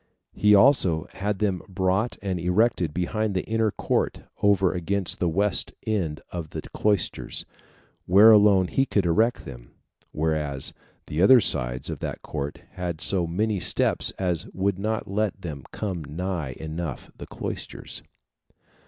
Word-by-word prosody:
He 105 0 +4
also 100 - +4
had 105 +1 -2
them 95 -3 -1
brought 95 +4 0
and 95 -3 -2
erected 90 -1 +1
behind 100 +5 -2
the 90 - -1
inner 110 0 +1
court - - -1 0.2
over 95 -3 +3
against 95 +2 -1
the 90 - +1
west 100 +5 +1
end 90 -9 -2
of 85 -3 -5
the - - -6
cloisters, 105 -4 -1 0.6
where 100 +5 +8
alone 100 -3 +6
he 135 +8 0
could 100 -3 +1
erect 110 +8 +1
them; - - -10 0.4
whereas 75 -3 -1 0.3
the 75 +3 -2
other 125 +7 +8
sides 60 - +1
of - - -6
that - - -5
court 75 -1 -5
had 90 -3 -4
so 90 -2 +2
many 105 +4 -1
steps 85 - +1
as 90 -4 0
would 95 0 0
not 110 +2 -2
let 100 0 -1
them 80 -8 -7
come 95 -6 -4
nigh 80 -1 -4
enough 80 -1 -6
the - - -8
cloisters. - - -7
95 Hz, 145 wpm, -25 LUFS, 80-105 Hz, 0.6 s, where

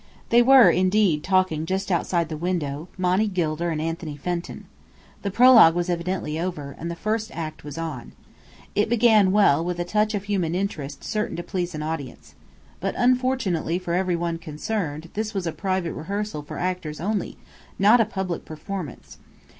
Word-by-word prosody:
They 235 +1 +6
were 250 -6 +7
indeed 185 -4 +2
talking 185 -5 +1
just 190 +2 -2
outside 170 -1 +1
the 160 - -5
window, 160 -2 -3
Monny 185 +4 +2
Gilder 170 -3 -1
and 160 -2 -2
Anthony 165 -1 -4
Fenton. 175 +3 -4 0.6
The 200 - -2
prologue 230 -6 +7
was 175 0 0
evidently 170 -2 -2
over, 155 -6 -4
and 170 - -4
the 170 - -4
first 215 +5 -2
act 160 -2 -6
was 145 0 -8
on. 160 -7 -5 0.6
It 210 +1 +1
began 220 -4 +5
well, 190 -7 +4
with 175 0 -3
a 175 - -2
touch 210 +3 +1
of 200 - -3
human 185 -5 -1
interest 150 -8 -4
certain 215 0 -2
to 175 - -4
please 180 -2 -3
an 150 - -4
audience. 155 -5 -6 0.5
But - - -2
unfortunately 245 -10 +1
for 180 -2 -4
every 180 0 +1
one 170 -1 -2
concerned, 160 0 -4
this 215 0 -3
was 190 -2 -2
a 165 - -1
private 185 -2 -2
rehearsal 200 0 -4
for 145 - -8
actors 180 -4 -3
only, 200 +3 -2 0.4
not 215 +5 +6
a - - +3
public 190 -4 -4
performance. 160 -1 -7
180 Hz, 170 wpm, -24 LUFS, 160-205 Hz, 0.6 s, were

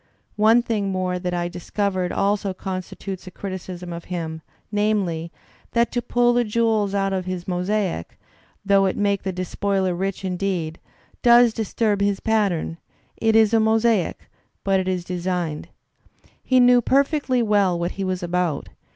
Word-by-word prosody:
One 225 +3 +5
thing 210 -4 -1
more 185 -1 -1
that 180 0 -3
I 175 0 -1
discovered 185 +1 -2
also 200 -1 0
constitutes 190 0 -6
a - - -5
criticism 180 -2 -6
of 170 0 -7
him, 160 -3 -4 0.3
namely, 200 -6 0 0.4
that 235 0 +2
to 245 - -1
pull 240 0 +2
the 240 0 +3
jewels 215 -2 +1
out 195 -1 +1
of 185 -1 -2
his 185 -1 -5
mosaic, 180 - -2 0.5
though 195 -1 +4
it 185 - -2
make 200 -1 +1
the 190 - -2
despoiler 185 +1 -1
rich 195 +2 -3
indeed, 180 -3 -2 0.4
does 240 -1 +6
disturb 215 -1 0
his 200 -1 +1
pattern; 195 -7 0 0.4
it 225 -1 +1
is 220 0 +5
a 225 - +5
mosaic, 220 -3 +1 0.4
but 195 -1 +2
it 185 - -2
is 185 -2 -1
designed. 175 -3 -3 0.7
He 255 -1 +3
knew 245 0 +6
per 275 +4 +4
fectly 275 -5 0
well 200 -5 +2
what 170 +1 -2
he 195 - -4
was 185 -1 -2
about. 175 -4 -1
195 Hz, 160 wpm, -23 LUFS, 180-220 Hz, 0.7 s, does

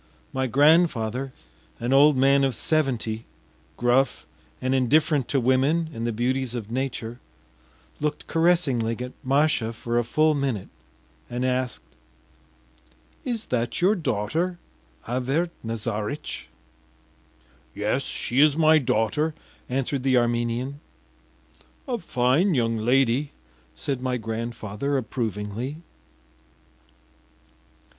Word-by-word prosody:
My 130 0 0
grandfather, 135 -3 +3 0.5
an 120 +3 0
old 145 +1 +6
man 135 +1 +4
of 135 -3 +1
seventy, 120 -6 0 0.5
gruff 125 +2 +2 0.3
and 130 +1 0
indifferent 140 +1 +3
to 140 - +1
women 135 +6 +2
and 115 -1 -3
the - - 0
beauties 125 +2 -1
of 110 -2 -5
nature, 120 -2 -3 0.8
looked 150 0 -2
caressingly 150 -10 +2
at 125 0 -5
Masha 140 -3 +2
for 120 +1 -1
a - - +1
full 155 +6 +2
minute, 135 -9 -2 0.6
and 125 +1 -2
asked: 130 -1 -1 1.4
“Is 235 -3 -3
that 120 -1 0
your 185 +4 +4
daughter, 160 - -1 0.5
Avert 135 +8 -1
Nazaritch?” 115 +3 -4 1.3
“Yes, 105 +6 0
she 125 -1 -2
is 150 0 +5
my 160 -1 +6
daughter,” 130 +5 0 0.3
answered 135 +1 -1
the 130 -1 +3
Armenian. 120 +3 0 1.1
“A 245 -3 -1
fine 135 +7 +2
young 115 -2 +1
lady,” 125 +4 +2 0.4
said 125 - -3
my 130 -1 -1
grandfather 115 +3 -3
approvingly. 115 +2 -3
130 Hz, 105 wpm, -25 LUFS, 115-145 Hz, 1.4 s, old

